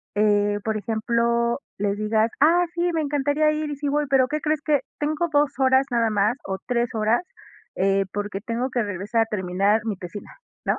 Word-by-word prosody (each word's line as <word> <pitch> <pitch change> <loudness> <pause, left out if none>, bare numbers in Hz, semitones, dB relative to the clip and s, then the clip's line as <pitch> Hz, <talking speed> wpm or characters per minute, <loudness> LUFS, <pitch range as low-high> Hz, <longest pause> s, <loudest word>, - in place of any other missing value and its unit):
eh, 205 0 +2
por 220 -1 -1
ejemplo, 235 +3 0 0.2
les 200 0 -1
digas: 215 +1 +1
"Ah, 335 +5 +5
sí, 345 0 0
me 320 - +1
encantaría 290 +1 +1
ir 305 0 -2
y - - -3
sí 285 +1 -3
voy, 295 +1 +1
pero 265 -2 +4
¿qué 300 +3 -2
crees?, 310 -1 0
que 295 -4 +2 0.2
tengo 310 +3 0
2 290 -1 +3
horas 265 0 +4
nada 235 -1 +2
más 210 +5 +1
o 190 0 -3
3 240 -1 0
horas, 220 +7 +1 0.5
eh, 195 +1 +2
porque 205 -1 -3
tengo 240 +3 -2
que 245 -2 0
regresar 205 +3 -1
a - - -5
terminar 200 +1 +1
mi 210 -4 -2
tesina, 180 +3 -8 0.4
¿no?" - - +1
235 Hz, 195 wpm, -23 LUFS, 205-290 Hz, 0.5 s, Ah